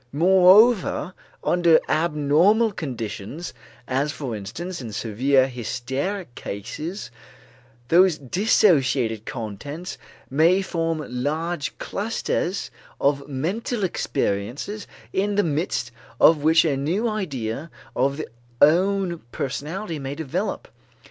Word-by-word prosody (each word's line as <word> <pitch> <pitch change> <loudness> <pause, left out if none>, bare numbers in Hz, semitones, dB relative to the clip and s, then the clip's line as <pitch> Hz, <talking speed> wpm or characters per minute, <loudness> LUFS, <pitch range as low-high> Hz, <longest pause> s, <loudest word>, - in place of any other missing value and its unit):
Moreover 185 - +5 0.3
under 170 -2 +4
abnormal 165 +8 +3
conditions, 130 - -5 0.3
as 135 +3 0
for 135 -6 -5
instance 155 - -6
in 115 -3 -6
severe 130 +6 +2
hysteric 130 - -4
cases, 125 - -6 0.8
those 180 -1 +5
dissociated 135 - +2
contents 140 - -6 0.3
may 165 +9 +3
form 165 -4 -2
large 150 +5 -2
clusters 200 -3 -2 0.3
of 140 0 +1
mental 190 - -2
experiences 140 - -2 0.3
in 200 +2 0
the 205 - +3
midst 150 -7 -1 0.3
of 165 - +7
which 160 +2 +5
a 150 -4 +2
new 170 - 0
idea 150 - -3 0.3
of 135 +3 +1
the 155 - -4 0.3
own 180 +3 +3
personality 160 +6 -4
may 135 0 -5
develop. 160 +7 -3
155 Hz, 100 wpm, -23 LUFS, 135-185 Hz, 0.8 s, of